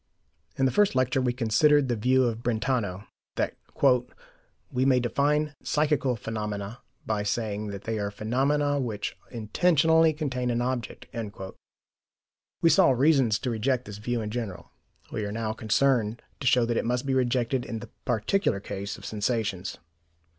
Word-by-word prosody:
In 135 - +2
the 130 - +3
first 205 -3 +3
lecture 130 0 +2
we 125 -1 +1
considered 135 +5 +3
the 120 - 0
view 130 +4 +3
of 115 -2 -1
Brentano, 110 -5 -1 0.3
that - - -1 1.2
"we 125 - +1
may 130 -1 +4
define 145 +5 +1
psychical 150 -4 +1
phenomena 105 -1 -5 0.2
by 110 -2 -1
saying 105 0 -2
that 100 -1 -6
they 115 -1 -2
are 100 0 -1
phenomena 140 +7 0
which 110 -6 -3
intentionally 160 +8 +3
contain 135 -5 -2
an 120 0 0
object." 125 0 -3 1.6
We 165 - +7
saw 190 -6 +6
reasons 130 -4 +4
to 125 0 -3
reject 125 +3 0
this 105 -1 -8
view 120 +2 -2
in 105 -1 -4
general; 110 -6 -5 0.4
we 110 - -3
are 100 - -3
now 110 0 -2
concerned 115 0 +1 0.2
to 130 - -2
show 125 -2 +4
that 115 0 -1
it - - +1
must 125 +2 -1
be 135 - 0
rejected 125 0 +1
in 115 - -5
the 110 - -9
particular 120 - +1
case 100 0 -5
of - - -12
sensations. 105 -4 -2
120 Hz, 155 wpm, -27 LUFS, 110-135 Hz, 1.6 s, We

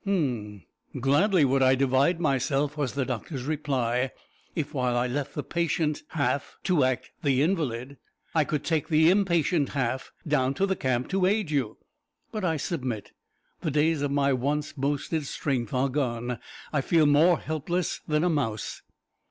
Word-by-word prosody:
"H'm! 120 - -1 0.4
Gladly 150 - +4
would 135 0 +2
I 130 0 +5
divide 135 +6 +2
myself," 140 -1 +1
was 145 -4 -2
the 135 -1 -1
doctor's 125 +2 -4
reply, 130 -4 0 0.5
"if 150 -3 -3
while 125 -3 0
I 120 - +2
left 140 +3 -3
the 145 - -2
patient 165 -2 0
half 140 -3 -1
to 175 -7 +3
act 130 -1 -1
the 140 -2 +2
invalid, 140 -6 -1 0.4
I 160 - +4
could 150 0 -2
take 160 -1 0
the 160 +1 +5
impatient 170 -6 +2
half 130 0 -1 0.2
down 135 -3 +1
to 195 - +2
the 190 -1 0
camp 130 -5 -1
to 190 -1 +2
aid 205 -4 +1
you. 130 -7 -1 0.5
But 215 -2 -4
I 165 -3 +1
submit. 130 - -3 0.5
The 160 - -2
days 150 +1 +2
of 145 - 0
my 140 -1 +2
once 145 +4 -1
boasted 145 +2 -1
strength 130 -7 -2
are 130 +2 +1
gone. 125 -4 -2 0.3
I 150 - +2
feel 160 +2 +3
more 155 +4 +5
helpless 160 +3 -2
than 150 +1 +1
a 180 - +3
mouse." 115 -9 -2
145 Hz, 165 wpm, -27 LUFS, 130-160 Hz, 0.5 s, I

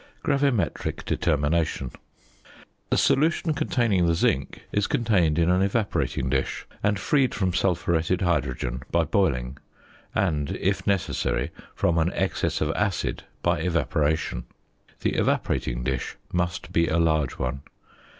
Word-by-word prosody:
GRAVIMETRIC 140 - 0
DETERMINATION. 75 -3 0 1.0
The - - +2
solution 160 +2 +3
containing 110 - +1
the 85 - +3
zinc 70 -4 0
is 105 -1 +1
contained 90 -10 +2
in 85 +1 +3
an 90 +1 +3
evaporating 100 - 0
dish, 65 +1 -1 0.2
and 105 0 +2
freed 130 +6 +2
from 95 -5 0
sulphuretted 90 -1 +1
hydrogen 65 -8 -1
by - - +2
boiling, 65 +3 0 0.6
and, 75 -7 0
if 95 +3 0
necessary, 100 -3 0 0.2
from 85 - +2
an 85 +2 +2
excess 95 - -1
of 75 - +1
acid 100 +1 -1 0.2
by 85 -1 +2
evaporation. 80 -6 0 0.6
The - - +1
evaporating - - 0
dish 65 0 -2 0.2
must 90 0 -2
be 85 0 +3
a 80 - +1
large 80 -5 +2
one. 65 +2 -2
85 Hz, 125 wpm, -25 LUFS, 75-95 Hz, 1.0 s, solution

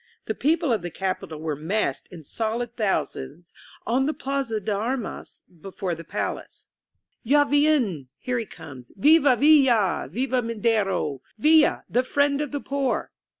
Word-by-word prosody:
The 220 - -2
people 310 +2 +1
of 215 - -1
the 175 - -5
capital 180 -3 -4
were 155 -1 -3
massed 185 +9 -2
in 170 -3 -11
solid 230 - -3
thousands 170 - -3 0.3
on 260 +3 +1
the 305 - -1
Plaza 270 -5 -2
de 210 +1 -2
Armas 230 +3 -4 0.2
before 190 -1 -4
the 165 0 -7
palace. - - -5 0.6
lis 255 +4 0
INSURGENT 290 -1 +3
MEXICO 290 +1 +4
''Taviener 200 - 0
"Here 250 -1 -2
he 230 - -4
comes 145 -9 -11
^ - - -20
"Viva 290 +1 +5
ViUa 265 - +4
P' 140 - -19
"Viva 255 0 0
Madero 210 - -1
r - - -35
"ViUa, 315 -1 +5
the 250 - +1
Friend 285 +2 +1
of 295 - -3
the 290 - -2
Poor 275 -2 -2
230 Hz, 170 wpm, -24 LUFS, 185-275 Hz, 0.6 s, Viva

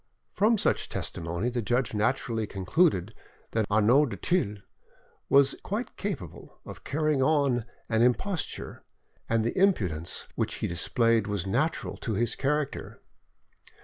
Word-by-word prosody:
From 220 +3 +3
such - - 0
testimony 85 +8 -3
the 120 0 -1
judge 120 +3 0
naturally 110 0 0
concluded 100 - +1 0.4
that 110 -2 0
Arnauld 115 +7 +4
du 100 - -5
Thill 105 - 0 0.7
was 140 0 +5
quite 215 +6 -4
capable 185 - -6
of - - -10
carrying 155 -1 0
on, 135 -5 +2 0.2
an 110 -1 +1
imposture, 145 +8 -1 0.5
and 115 -1 +2
that 115 - 0
the - - -1
impudence 90 - 0
which - - -2
he - - -3
displayed 115 +5 +1
was 100 -4 -2
natural 135 +12 -1
to 115 - -3
his 120 +2 +1
character. 145 +1 -2
120 Hz, 135 wpm, -28 LUFS, 105-150 Hz, 0.7 s, was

